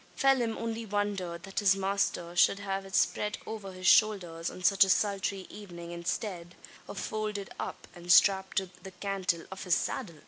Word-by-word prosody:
Phelim 255 -5 +2
only 230 0 -3
wondered, 200 -5 -2
that 195 +1 -3
his 195 -2 +4
master 195 -3 -1
should 185 - +5
have 195 -1 -4
it 190 - -5
spread 210 0 +1
over 210 -3 -6
his 185 0 -9
shoulders 180 -6 +3
on 185 - -10
such 195 +2 +6
a 190 - 0
sultry 195 -1 0
evening 175 -5 -9
instead 175 0 -4 0.3
of - - -8
folded 210 -2 -3
up, - - -6
and 175 0 -4
strapped 190 +1 +5
to 190 -2 0
the 190 - -8
cantle 185 -3 -2
of 190 - -7
his 180 -3 +3
saddle! 185 -10 -3
195 Hz, 175 wpm, -30 LUFS, 180-205 Hz, 0.3 s, such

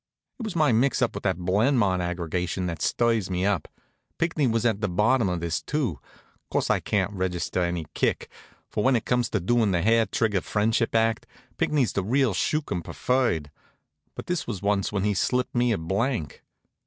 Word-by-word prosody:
It - - -5
was 215 - -5
my 155 -5 +3
mix 125 +5 +2
up 120 - 0
with - - -5
that 95 -3 +1
Blenmont 100 +1 +2
aggregation 90 +1 -2
that 85 -2 -4
stirs 115 -5 +1
me 90 0 -1
up. 100 -6 0 0.5
Pinckney 160 -4 +1
was 115 0 0
at 110 -3 +1
the 105 - 0
bottom 105 +4 +2
of 90 -2 -2
this, 85 -1 -1
too. 130 - -2 0.5
Course, - - 0
I - - +2
can't 100 0 -1
register 90 -1 -2
any 85 -2 -1
kick; - - 0 0.4
for 105 - -2
when 130 0 +4
it 115 - -1
comes 125 -2 +1
to 110 - 0
doing 110 +4 +2
the 85 -3 +1
hair 115 +1 +3
trigger 105 -4 0
friendship 110 +2 0
act, 115 0 +1 0.3
Pinckney's 135 -9 +1
the 100 - 0
real 125 +2 +2
skookum 140 - -1
preferred. 100 - 0 0.6
But - - -7
this 180 -1 -2
was 110 -5 -3
once 100 -1 +1
when 100 -2 -1
he 105 0 +2
slipped 125 +6 0
me 120 0 +2
a 110 - +1
blank. 95 - -2
105 Hz, 190 wpm, -26 LUFS, 90-120 Hz, 0.6 s, when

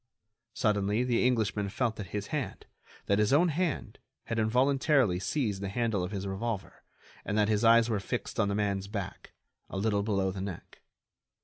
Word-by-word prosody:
Suddenly 105 +1 +1
the 125 -2 +1
Englishman 105 -4 0
felt 115 +2 -1
that 105 - -5
his 105 +1 -4
hand—that 120 -7 -4
his 105 -1 +3
own 165 +6 +5
hand 155 - -2 0.2
had 115 -1 -2
involuntarily 130 - +3
seized 105 -1 -1
the 100 - -3
handle 110 -3 0
of 90 - -3
his 100 -1 -4
revolver, 100 +1 -4 0.4
and 105 - -2
that 105 0 +3
his 105 +1 +1
eyes 115 0 +6
were 110 -3 0
fixed 120 +4 -4
on 105 - +3
the 100 - -1
man's 100 -2 -1
back, 100 -3 -6 0.4
a - - -5
little 100 0 +1
below 100 -2 0
the 95 0 -6
neck. 95 -3 -7
105 Hz, 175 wpm, -30 LUFS, 100-120 Hz, 0.4 s, eyes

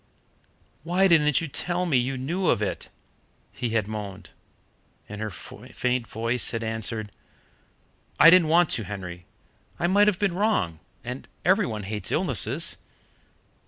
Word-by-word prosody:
"Why 180 +4 +2
didn't 150 -5 +4
you 165 - -3
tell 175 +5 -1
me 165 -6 0
you 130 +2 -1
knew 170 +8 -2
of - - +3
it?" 105 - -3 0.6
he 120 - -3
had 110 -3 0
moaned, 100 -3 -7 0.8
and 105 +1 -8
her 110 - -2
faint 125 +5 -4
voice 115 +2 0
had 115 0 -3
answered: 110 -1 -2 1.1
"I 165 - +9
didn't 180 -3 +6
want 170 +1 +4
to, 115 - 0
Henry 90 -3 -7 0.5
I 175 - -1
might 200 +4 +4
have 205 -3 +3
been 200 -3 0
wrong 180 - 0 0.2
and 125 +2 -7 0.2
every 185 -5 +3
one 110 -3 -5
hates 105 -1 -4
illnesses." - - 0
125 Hz, 145 wpm, -25 LUFS, 105-175 Hz, 1.1 s, I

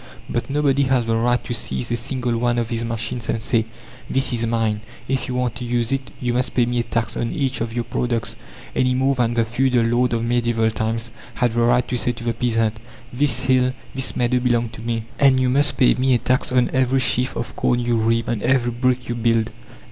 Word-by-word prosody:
But - - -3
nobody 140 -1 +2
has 130 -3 +2
the 115 0 0
right 120 +2 +1
to 120 - -4
seize 120 +1 -3
a - - +2
single 120 0 -2
one 120 +1 +1
of 115 -1 -1
these 115 -1 -2
machines 115 0 -3
and 115 - 0
say: 115 0 +1 0.4
"This 135 -1 +1
is 115 -1 0
mine; 110 -2 0 0.3
if 135 -1 -1
you 125 - -3
want 125 -2 0
to 125 - -6
use 120 0 -1
it 135 -1 -2
you 125 -3 -1
must 125 +1 -1
pay 120 - +4
me 120 0 -1
a - - +1
tax 115 -1 -2
on 115 - -2
each 135 -5 -1
of 115 0 -2
your 120 +1 -2
products," 115 -2 -2 0.4
any 125 0 +2
more 135 +2 +2
than 120 -2 0
the 115 -1 +2
feudal 120 +1 +1
lord 120 +1 +2
of 115 0 0
medieval 115 -1 +1
times 115 +1 -2 0.2
had 125 -3 +1
the 120 +1 0
right 120 +1 +3
to 125 - -1
say 120 0 +1
to 115 - -9
the 120 0 0
peasant: 115 -3 0 0.4
"This 130 -1 +1
hill, 130 -1 +2 0.2
this 135 0 -2
meadow 125 +1 +1
belong 120 -2 +1
to 110 - -11
me, 115 -1 -2 0.2
and 135 -2 +5
you 130 -1 +2
must 145 +3 +2
pay 125 - +5
me 130 0 +2
a - - +4
tax 130 +3 0
on 125 -1 +2
every 130 0 +2
sheaf 125 0 +2
of 120 - -5
corn 120 - +1
you 120 -1 0
reap, 115 +1 +1
on 115 -3 -1
every 125 -1 +2
brick 125 +1 0
you 120 - -2
build." 115 -1 +1
120 Hz, 235 wpm, -21 LUFS, 115-125 Hz, 0.4 s, and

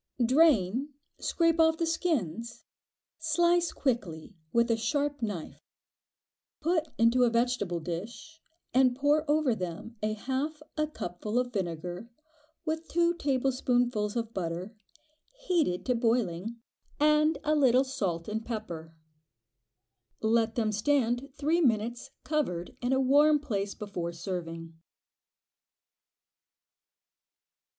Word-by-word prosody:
Drain, 265 - +3 0.2
scrape 330 -1 +1
off 320 0 +5
the 330 - 0
skins, 240 - -2 0.5
slice 345 +2 +2
quickly 205 - -2 0.2
with 235 0 +3
a - - +4
sharp 285 +4 -1
knife; 205 -8 -4 1.0
put 330 0 +1
into 230 +2 +4
a 245 - +5
vegetable 230 -7 0
dish, 205 - -7 0.3
and 255 -1 +4
pour 290 +3 +2
over 295 -4 +3
them 185 +4 -6
a 215 0 0
half 270 +7 -3
a 305 -1 0
cupful 210 - -4
of 245 -1 0
vinegar, 180 +2 -4 0.6
with 320 +1 -2
two 340 0 +2
tablespoonfuls 250 -7 0
of 230 -1 -3
butter, 180 +3 -4 0.7
heated 320 - +1
to 250 - +2
boiling, 230 -3 0 0.4
and 305 +1 +4
a 305 - +2
little 260 -3 +4
salt 195 -12 -3
and 220 +1 -3
pepper. 170 -9 -6 1.2
Let 225 0 +2
them 220 -3 +1
stand 245 +3 +1
three 315 +4 +1
minutes 240 -1 0
covered 210 - -2
in 245 +1 0
a 265 - +3
warm 290 +3 +5
place 205 -8 -3
before 180 -5 -4
serving. 165 -1 -5
245 Hz, 110 wpm, -29 LUFS, 205-295 Hz, 1.2 s, off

